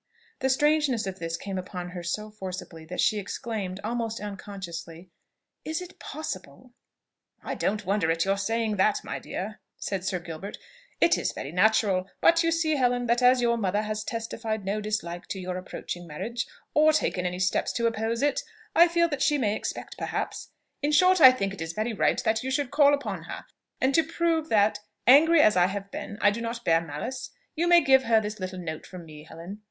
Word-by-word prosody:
The 265 - +1
strangeness 290 -4 +2
of 190 0 -5
this 165 0 -3
came 195 -2 -4
upon 180 -1 -6
her 180 -1 -6
so 210 +5 -4
forcibly, 185 -5 -7
that 180 +3 -7
she 215 - +3
exclaimed, 200 -2 -4
almost 230 0 -2
unconsciously, 185 -4 -8 0.5
"Is 315 +1 -2
it 360 0 -10
possible!" 245 - -7 0.7
"I - - -3
don't 210 0 -1
wonder 195 -3 +1
at 165 +1 +1
your 195 +1 +1
saying 225 +1 -1
that, 200 +2 +2
my - - -5
dear," 210 +3 -6 0.2
said 195 -3 -3
Sir 185 0 -1
Gilbert: 175 +3 -7 0.4
"It 340 - +4
is - - -1
very 140 - -6
natural. 195 0 +2
But 335 0 +5
you 330 -1 +2
see, 320 -2 +1
Helen, 245 -1 +1
that 240 +1 +2
as 250 0 +5
your 235 0 +2
mother 205 +1 0
has 215 0 -3
testified 225 -2 -4
no 205 +2 -1
dislike 190 -5 -3
to 195 - -4
your 180 0 -4
approaching 175 -1 -6
marriage, 235 +11 -4 0.3
or 310 +1 +5
taken 180 -11 0
any 180 0 -4
steps 185 0 +1
to 235 - -1
oppose 230 +2 0
it, 290 -1 +2 0.3
I 340 +1 +8
feel 340 0 +2
that 290 -3 -3
she 295 - +3
may 215 -6 +1
expect, - - -5
perhaps, - - -3 0.3
in 295 +1 0
short, 365 +2 +5
I 260 - +11
think 195 -6 -2
it 195 - -9
is 165 0 -4
very 220 +5 -2
right 220 - +2
that 220 -1 +1
you 260 - -3
should 275 -1 -1
call 290 -1 +5
upon 205 - -5
her; - - -7 0.3
and 265 +1 +2
to 325 - +5
prove 330 -1 0
that, 210 -1 +3 0.3
angry 305 +5 +7
as 215 - +5
I 180 0 +5
have 200 +1 -5
been, 205 - -6
I 205 - +5
do 230 +3 -4
not 235 0 -5
bear 165 0 +4
malice, 245 - -5 0.3
you 335 +2 +1
may 345 0 +7
give 265 -3 +4
her 225 -1 +4
this 215 0 -5
little 185 0 -5
note 155 -3 -6
from 180 -2 -10
me, 150 -1 -12
Helen. 170 +5 -9
215 Hz, 205 wpm, -27 LUFS, 185-260 Hz, 0.7 s, I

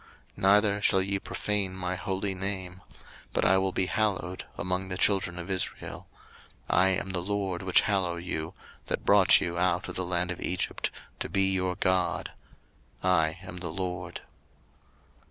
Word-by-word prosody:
03:022:032 - - -13
Neither 100 +1 +4
shall 95 -2 +4
ye 100 +1 -1
profane 100 -2 -2
my 90 -1 -2
holy 95 +2 -2
name; 95 -1 -3 0.5
but - - +1
I 95 +1 +5
will 95 0 0
be 95 - +1
hallowed 95 -3 -1
among 90 +1 -2
the 90 - -3
children 95 -3 +2
of 90 +2 -4
Israel: 95 -1 -2 0.6
I 90 +2 +4
am 95 0 0
the 90 - 0
LORD 95 -1 -2
which 95 -1 +4
hallow 95 -4 0
you, 85 -2 -4 0.3
03:022:033 - - -29
That - - -3
brought - - +7
you 85 0 -2
out 90 -1 +1
of - - -6
the 95 - -1
land 90 0 0
of 90 - -6
Egypt, 90 0 -1 0.3
to - - -3
be 95 0 +2
your 90 -1 0
God: 95 -2 0 0.7
I 80 -3 +2
am 90 -1 -8
the 90 -1 -4
LORD. 90 0 -4
95 Hz, 170 wpm, -28 LUFS, 90-95 Hz, 0.7 s, brought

